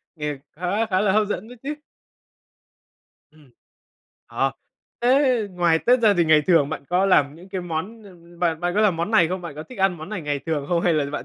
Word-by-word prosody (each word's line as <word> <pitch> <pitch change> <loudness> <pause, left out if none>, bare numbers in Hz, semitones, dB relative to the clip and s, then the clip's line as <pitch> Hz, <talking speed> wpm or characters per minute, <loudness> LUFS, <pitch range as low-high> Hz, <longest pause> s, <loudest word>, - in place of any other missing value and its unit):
Nghe 150 -2 -4 0.2
khá 180 +7 -1
khá 190 -3 0
là 205 -2 +2
hấp 210 +1 +2
dẫn 210 +1 -4
đấy 245 +1 -12
chứ. 290 +2 -3 1.6
Ừm. 150 -3 -22 0.8
Ờ, 130 +3 -1 0.5
thế 250 -3 +2
ngoài 175 -3 +2
Tết 245 +7 +3
ra 215 -3 +4
thì 175 -2 +2
ngày 155 -1 +4
thường 165 -6 +4
bạn 150 - -6
có 180 +2 +2
làm 145 -7 +3
những 175 +4 -14
cái 190 -1 -4
món, 175 +7 -5
ưm, 175 -3 -17
bạn 165 -2 0
bạn 175 0 -1
có 210 - +2
làm 205 -5 +3
món 170 +5 -2
này 180 -7 +4
không? 185 +1 -3
Bạn 170 -4 -8
có 155 - -7
thích 250 +8 -13
ăn 190 -2 +2
món 155 +1 -9
này 210 -3 -4
ngày 145 -1 -2
thường 150 -3 -2
không 170 -1 +1
hay 175 - +2
là 150 -2 +1
bạn 150 - -5
175 Hz, 230 wpm, -23 LUFS, 160-205 Hz, 1.6 s, ra